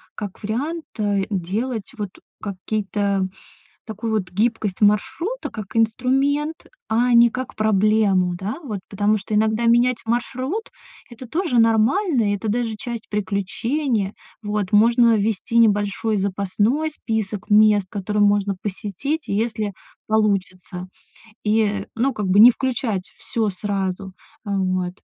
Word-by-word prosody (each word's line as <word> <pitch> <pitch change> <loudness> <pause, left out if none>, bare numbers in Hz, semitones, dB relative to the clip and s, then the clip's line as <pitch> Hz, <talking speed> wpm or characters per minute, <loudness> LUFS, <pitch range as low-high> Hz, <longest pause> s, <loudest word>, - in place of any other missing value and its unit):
как 205 0 -7
вариант, 290 +10 -3
э, 200 -2 +1
делать, 205 +5 -2
вот, 205 -3 -3 0.3
какие-то 200 -1 -1 0.6
такую 220 +1 -3
вот 195 -4 -1
гибкость 215 -1 0
маршрута, 330 - +1
как 210 -1 -7
инструмент, 270 +7 +1 0.2
а 240 +2 +2
не 235 0 +7
как 255 +2 -5
проблему, 210 -3 +2
да. 195 +7 -4
Вот 210 -7 -4
потому 205 +1 +2
что 210 +2 -5
иногда 220 +2 +2
менять 240 +1 +4
маршрут- 255 - -2 0.4
это 240 +2 -10
тоже 325 -4 0
нормально 230 - +3
и - - 0
это 215 +2 -5
даже 225 0 -1
часть 235 -1 -6
приключения. 210 +3 -1 0.3
Вот. 210 -2 -2
Можно 230 +2 +5
ввести 215 +2 -1
небольшой 210 0 +2
запасной 205 +10 0
список 220 -8 -4
мест, 210 -2 +5
которые 210 +1 -1
можно 205 -1 +2
посетить, 215 - -3
если 215 0 -1 0.4
получится, 185 -4 -1 0.6
и, 210 -2 +1
ну, 260 +4 +1
как 210 -2 -2
бы, 195 +2 +5
не 235 +3 +11
включать 230 -7 -2
всё 225 -1 -1
сразу. 195 -1 -3 0.3
Э, - - -4
вот. 185 -1 -1
215 Hz, 125 wpm, -22 LUFS, 200-235 Hz, 0.6 s, не